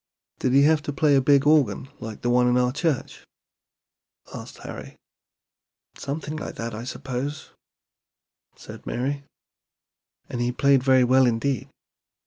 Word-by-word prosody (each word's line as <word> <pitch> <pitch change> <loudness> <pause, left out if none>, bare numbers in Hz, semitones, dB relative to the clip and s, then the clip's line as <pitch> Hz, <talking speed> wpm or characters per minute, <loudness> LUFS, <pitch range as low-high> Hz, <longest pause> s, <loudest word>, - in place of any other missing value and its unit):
"Did 130 - 0
he 140 +1 +6
have 155 0 +4
to 145 - -5
play 145 +1 +3
a 135 - +4
big 140 +1 +4
organ 140 -7 +3
like 110 -1 -8
the 120 - +1
one 125 0 +4
in 125 0 +3
our 125 0 +2
church?" 145 0 -2 1.1
asked - - -9
Harry. - - -8 1.0
"Something 150 +2 -5
like - - -6
that, 115 0 -5
I 115 +2 -6
suppose," 135 +3 -5 1.0
said - - -12
Mary; 140 +3 -3 1.0
"and 120 - -4
he 120 0 0
played 140 +1 +3
very 130 -1 +4
well 130 +1 +4
indeed. 120 +1 -1
130 Hz, 140 wpm, -24 LUFS, 125-145 Hz, 1.1 s, he